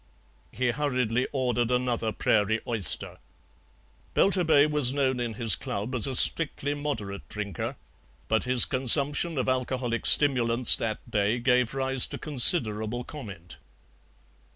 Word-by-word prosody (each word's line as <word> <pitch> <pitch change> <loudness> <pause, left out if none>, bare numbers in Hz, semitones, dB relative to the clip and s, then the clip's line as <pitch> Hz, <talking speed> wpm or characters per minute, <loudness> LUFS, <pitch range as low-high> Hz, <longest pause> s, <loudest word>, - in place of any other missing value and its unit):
He 125 +2 -3
hurriedly 125 -3 -3
ordered 125 -3 -3
another 125 -3 -3
prairie 110 +1 -2
oyster. 110 -8 -1 1.0
Belturbet 160 -6 +1
was 145 -4 +3
known 130 -2 -3
in 120 -2 -6
his 115 -1 +3
club 105 +6 -7
as 125 -1 0
a 130 - -3
strictly 145 0 +1
moderate 115 -10 -7
drinker; 105 -5 -7 0.7
his 125 -1 +1
consumption 140 +5 0
of 130 - -3
alcoholic 125 -2 -3
stimulants 125 -4 +4
that 115 +1 -7
day 105 +2 -2
gave 125 0 -1
rise 135 -1 +4
to - - -8
considerable 120 -5 +5
comment. 95 - -11
125 Hz, 120 wpm, -24 LUFS, 115-135 Hz, 1.0 s, considerable